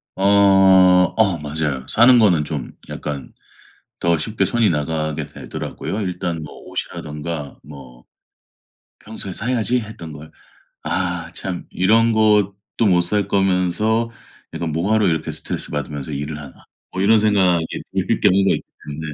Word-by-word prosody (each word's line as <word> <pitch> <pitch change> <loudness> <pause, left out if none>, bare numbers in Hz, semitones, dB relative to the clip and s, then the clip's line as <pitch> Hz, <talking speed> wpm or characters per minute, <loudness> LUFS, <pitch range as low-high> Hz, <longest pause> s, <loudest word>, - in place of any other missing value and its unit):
어. 95 - -3 0.9
어 100 -6 +2
맞아요. 75 -3 -3
사는 120 +2 +6
거는 90 -9 +4
좀 75 -6 -5 0.2
약간 70 -4 -6 0.7
더 85 -1 +2
쉽게 105 +7 -1
손이 115 -5 +2
나가게 75 0 -2
되더라고요, 105 - -6
일단 90 -3 -3
뭐 75 - -10
옷이라든가 75 0 -6
뭐 65 -4 -13 1.0
평소에 105 -3 -8
'사야지.' 120 +2 0
했던 95 -8 -9
걸. 75 +2 -11 0.5
'아 - - -2
참 95 -2 -5
이런 115 +5 +3
것도 105 -3 +3 0.3
못 90 -2 +4
살 100 +3 -1
거면서 100 +4 +1 0.4
약간 85 -2 -3
뭐 85 +7 -1
하러 110 -2 +3
이렇게 80 -2 -1
스트레스받으면서 75 0 -5
일을 75 +1 -4
하나?' 70 -2 -12 0.3
뭐 95 - -3
이런 110 +2 +5
생각이 95 -6 +3 0.4
들 - - +1
경우가 95 +1 +4
있기 - - -6 0.2
때문에 75 +1 -6
90 Hz, 280 characters per minute, -20 LUFS, 75-105 Hz, 1.0 s, 사는